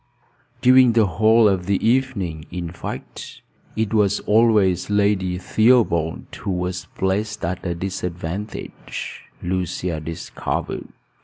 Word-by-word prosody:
During 125 -1 +6
the 115 -2 +4
whole 110 +5 +4
of 95 -3 0
the 100 -1 +2
evening, 110 - 0
in 85 -2 -5
fact, 85 - -8 0.3
it 110 0 -1
was 105 -2 +3
always 105 -5 +3
Lady 100 -3 +1
Theobald 95 -6 +2
who 100 - -5
was 90 0 -2
placed 105 +2 -1
at 90 +1 -3
a 85 -2 -2
disadvantage, 90 +2 -5 0.2
Lucia 90 -2 -2
discovered. 80 +1 -4
95 Hz, 110 wpm, -22 LUFS, 90-110 Hz, 0.3 s, During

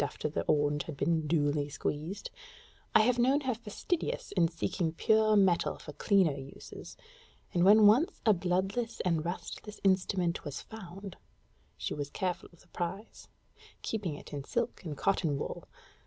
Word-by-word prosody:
after - - -3
the 150 - -2
orange 145 0 +2
has 155 - -6
been 155 +2 0
duly 145 -2 +1
squeezed 155 +7 -4 0.6
I - - +9
have 245 +2 +2
known 265 +4 +4
her 260 -2 0
fastidious 340 - -3
in 175 -3 +3
seeking 165 0 -2
pure 215 +4 +3
metal 190 -4 +3
for 150 - -10
clean 195 +4 +3 0.3
uses; - - -10 0.6
and 175 - +3
when 210 +3 +8
once 240 +11 +5
a 215 - +7
bloodless 190 +6 -1
and 165 -4 +1
rustless 195 +4 -6
instrument 185 -2 +1
was 145 -1 -5
found, 195 -3 -9 0.6
she - - -3
was 145 -1 -4
careful 180 +2 -3
of 170 - -21
the - - -23
prize, 185 +5 -5 0.6
keeping 200 -9 -2
it - - -11
in 140 -1 -4
silk - - -2
and 155 -5 -5
cotton 160 -5 +1
wool. - - -5
180 Hz, 155 wpm, -31 LUFS, 155-215 Hz, 0.6 s, I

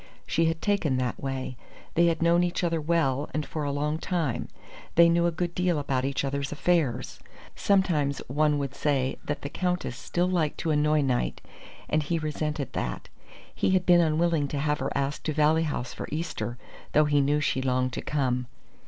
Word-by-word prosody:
She 165 - +1
had 165 0 -1
taken 180 -10 +1
that 125 -1 -2
way. 130 -2 -4 0.4
They 170 +1 +4
had 165 0 +1
known 170 +1 +4
each 175 +1 -1
other 165 -2 +1
well 150 -3 +1
and 155 -1 -1
for 155 +3 -4
a 145 - -1
long 150 +2 -1
time. 165 -9 -1 0.5
They 170 0 +8
knew 170 0 +3
a - - +1
good 175 +1 -2
deal 180 -2 +1
about 135 -3 -1
each 140 0 -1
other's 140 0 -2
affairs. 150 -6 0 0.4
Sometimes 170 -8 +2
one 150 +2 +2
would 140 -2 -3
say 135 -3 0
that 145 - -4
the - - -2
Countess 180 -6 -2
still 175 +7 -1
liked 170 -5 0
to 160 - 0
annoy 150 0 +3
Knight, 130 -3 0 0.5
and 155 - +1
he 160 +3 -1
resented 150 -3 -3
that. - - -4 0.4
He - - 0
had 180 - -3
been 175 -1 +6
unwilling 160 -2 +2
to 145 - -4
have 150 +1 0
her - - -1
asked 140 +1 -2
to 155 - 0
Valley 155 +2 +3
House 125 -5 -3
for - - -6
Easter, 150 -6 -3 0.4
though 150 +1 +5
he 145 -1 +3
knew 145 +2 +2
she 135 -2 0
longed 130 -1 0
to - - -3
come. 125 -4 -1
150 Hz, 195 wpm, -27 LUFS, 140-170 Hz, 0.5 s, They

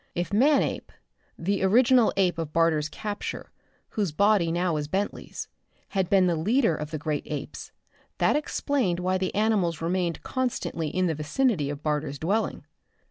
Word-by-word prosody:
If 175 +3 -2
Manape 275 +7 +2 0.5
the 195 +4 -1
original 235 +4 +5
ape 180 -4 +2
of 160 -2 -3
Barter's 160 -2 +2
capture, 210 +2 -5 0.4
whose 205 -6 -1
body 200 0 +3
now 175 0 0
was 150 -1 -2
Bentley's 195 +6 -3 0.4
had 190 -3 -1
been 195 -2 +5
the 175 -2 +2
leader 215 - +2
of 150 0 -5
the 155 - -4
great 150 0 -2
apes, 150 -3 -6 0.5
that - - +3
explained 280 - 0
why 185 +1 0
the 185 -1 -2
animals 200 -7 +1
remained 170 0 -1
constantly 245 - -2
in 185 +5 0
the 165 - +1
vicinity 155 - 0
of 145 0 -6
Barter's 150 -2 -1
dwelling. 200 +9 -1
180 Hz, 155 wpm, -26 LUFS, 160-210 Hz, 0.5 s, original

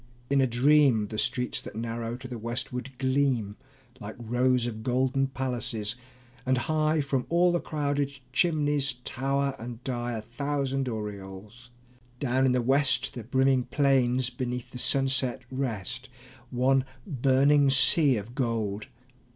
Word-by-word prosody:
In 140 -1 +4
a 130 - +3
dream 125 -3 +4
The 110 - -3
streets 125 -1 -1
that - - -10
narrow 115 +1 -4
to 130 0 -9
the 120 -2 -6
westward 125 +3 -4
gleam 130 -6 0 0.4
Like 105 -1 -7
rows 120 +1 +1
of 110 -2 -5
golden 130 +3 +1
palaces; 125 -5 -2 0.5
and 130 0 +1
high 155 +4 +1
From 135 -2 -2
all 175 +1 +4
the 175 - +1
crowded 145 -3 -2 0.2
chimneys 145 -5 +1
tower 140 +1 -1
and 120 +1 -8
die 120 -2 -3
A 110 - -3
thousand 135 +2 -2
aureoles. 105 +2 -7 0.5
Down 130 0 +2
in - - +3
the 125 -1 +1
west 135 +2 +2
The 120 - -7
brimming 130 +2 +2
plains 130 -3 +2
beneath 125 -1 -4
the 125 - -7
sunset 130 -1 +1
rest, 125 -1 -3 0.4
One 130 +2 +2 0.2
burning 140 +2 +3
sea 135 0 +5
of 105 +4 -7
gold. 115 -5 -2
130 Hz, 140 wpm, -27 LUFS, 120-135 Hz, 0.5 s, sea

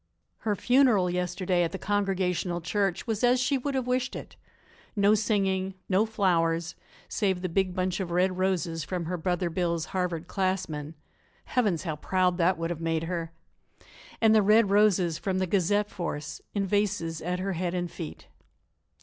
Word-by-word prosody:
Her 210 -2 -1
funeral 245 -6 +3
yesterday 180 0 0
at 170 - 0
the - - -2
Congregational 190 -3 0
Church 195 +1 -1
was 225 -1 -2
as 245 +1 +4
she 270 +2 +1
would 275 +2 -3
have 260 -2 0
wished 250 +1 -1
it; - - -8 0.6
no 205 0 +4
singing, 195 -3 0
no 200 +4 +2
flowers 170 -5 +1 0.3
save 190 -3 -1
the - - +1
big 185 +1 0
bunch 185 0 -1
of 185 -3 -3
red 180 +2 +1
roses 175 -4 0
from 175 +2 -3
her 180 +3 -2
Brother 180 +1 -1
Bill's 170 -2 -1
Harvard 175 -3 -2
classmen 175 -6 -2 0.5
Heavens, 205 -10 0
how 160 -4 -3
proud 180 +2 +1
that 180 +1 +3
would 165 +1 -2
have 165 -1 -5
made 165 -1 0
her! 165 -1 -3 0.9
and 220 -1 +5
the 215 - +6
red 210 0 +4
roses 195 -5 +3
from 190 -2 -1
the 185 - +1
Gazette 205 +3 +1
force 160 -6 -5
in 200 -1 +1
vases 195 -5 -1
at 180 +2 -2
her 190 +1 -2
head 180 +1 -2
and 175 -1 -2
feet. 165 -3 -8
185 Hz, 170 wpm, -28 LUFS, 170-205 Hz, 0.9 s, the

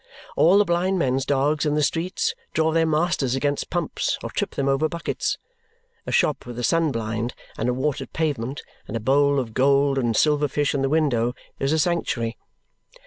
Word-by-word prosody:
All 175 +5 +5
the 205 - +5
blind 180 +2 +1
men's 135 -4 0
dogs 145 +2 +1
in 150 -1 +1
the 150 - +2
streets 165 +6 0 0.2
draw 160 0 +2
their 165 0 +2
masters 155 -5 +1
against 145 +1 -1
pumps 175 -3 -1
or - - -5
trip - - -3
them 140 - -1
over 140 +3 +2
buckets. 170 -1 -2 0.7
A - - -2
shop 150 - +1
with 120 -1 -7
a 120 - -3
sun 165 +2 +2
blind, 115 0 -3 0.2
and - - -1
a - - +1
watered 135 0 -2
pavement, 140 -4 -2 0.2
and 115 - -3
a - - -3
bowl 140 +4 +3
of 115 -4 -4
gold 140 +1 +3
and 120 -3 0
silver 150 -1 +3
fish 145 +1 0
in 140 - 0
the 135 - +1
window, 125 -6 +1 0.2
is 135 +1 0
a 160 - +2
sanctuary. 150 -9 0
140 Hz, 195 wpm, -23 LUFS, 130-160 Hz, 0.7 s, All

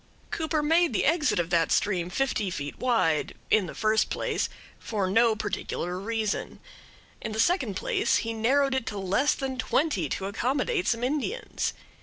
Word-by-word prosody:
Cooper 315 -1 -1
made 325 0 +3
the - - +1
exit 295 -8 +2
of 175 0 -1
that 165 -2 +2
stream 180 -4 +1
fifty 215 -2 0
feet 145 -4 -5
wide, 225 -12 +1 0.2
in 205 -4 +4
the - - -8
first 220 0 +2
place, - - -1 0.3
for 205 -4 -2
no 225 +2 +4
particular 180 -3 -3
reason; 220 0 -2 0.6
in 220 - -4
the 220 - -3
second 260 - +2
place, - - +1
he 230 - -2
narrowed 270 +5 +2
it 265 -3 -1
to 205 - -3
less 195 +9 +2
than 265 -2 -4
twenty 255 - +1
to 190 - -3
accommodate 270 - 0
some 230 0 +1
Indians. 305 - -2
230 Hz, 165 wpm, -27 LUFS, 195-280 Hz, 0.6 s, in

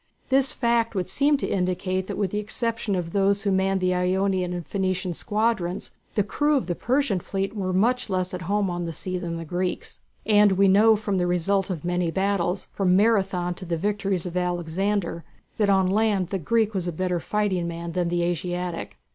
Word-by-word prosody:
This 270 0 +3
fact 235 -2 +1
would 185 -2 -1
seem 285 +1 +2
to - - -3
indicate 185 0 -1
that - - -4
with 200 -3 -1
the 210 - -1
exception 225 0 -2
of 175 -2 -3
those 200 +1 +2
who 200 - +1
manned 190 0 +1
the 185 0 +2
Ionian 185 0 +1
and 175 -2 -4
Phoenician 185 -2 -1
squadrons 210 -2 -1 0.2
the 205 - +3
crews 295 +8 +1
of - - -8
the 175 - -1
Persian 245 -1 0
fleet 195 +4 -3
were 190 -3 -2
much 230 +6 +1
less 185 -1 -1
at 180 - -4
home 205 -1 +2
on 175 -1 -3
the 165 - -4
sea 185 +2 -4
than 170 -2 -4
the 165 - -6
Greeks. 180 +3 -3 0.3
And 210 -2 +5
we 195 +1 +4
know 215 +3 +6
from 205 -3 -1
the 180 - +1
result 185 +3 +1
of 175 -4 -4
many 175 -1 0
battles, 190 0 0
from 185 -2 +2
Marathon 195 -4 +2
to 185 +2 -9
the 170 -1 -1
victories 195 -1 -1
of 175 -1 -5
Alexander, 180 +1 -1 0.4
that 210 -2 +3
on 190 -1 +4
land 200 -1 +1
the 195 - -2
Greek 220 +5 +1
was 185 -3 -2
a - - 0
better 180 +1 -1
fighting 190 -2 -1
man 170 0 -5
than 175 0 0
the 175 0 0
Asiatic. 175 - -3
190 Hz, 205 wpm, -25 LUFS, 180-205 Hz, 0.4 s, know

